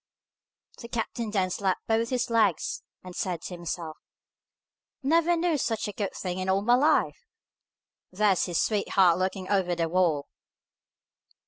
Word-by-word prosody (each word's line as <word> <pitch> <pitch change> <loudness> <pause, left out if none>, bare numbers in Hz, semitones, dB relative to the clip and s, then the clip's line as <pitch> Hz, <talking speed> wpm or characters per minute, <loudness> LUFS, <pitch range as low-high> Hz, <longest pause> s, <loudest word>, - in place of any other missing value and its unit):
The 235 - -8
captain 235 -1 -3
then 190 -3 0
slapped 190 0 -1
both 225 +1 +1
his 250 -1 -1
legs, 220 -8 +1 0.2
and 180 -1 -10
said 175 -3 -3
to - - -6
himself, 170 -2 -5 1.1
"Never 335 +4 +3
knew 330 -3 +1
such 225 -4 -1
a - - -3
good 200 -2 -3
thing 180 -1 -4
in 185 0 -2
all 195 +1 +2
my 240 +3 +4
life! 270 +5 +2 0.8
There's 195 0 +2
his 175 -3 -1
sweetheart 190 -4 +3
looking 185 0 -2
over 185 -3 +1
the 165 -1 0
wall!" 165 -4 +1
195 Hz, 145 wpm, -27 LUFS, 180-230 Hz, 1.1 s, my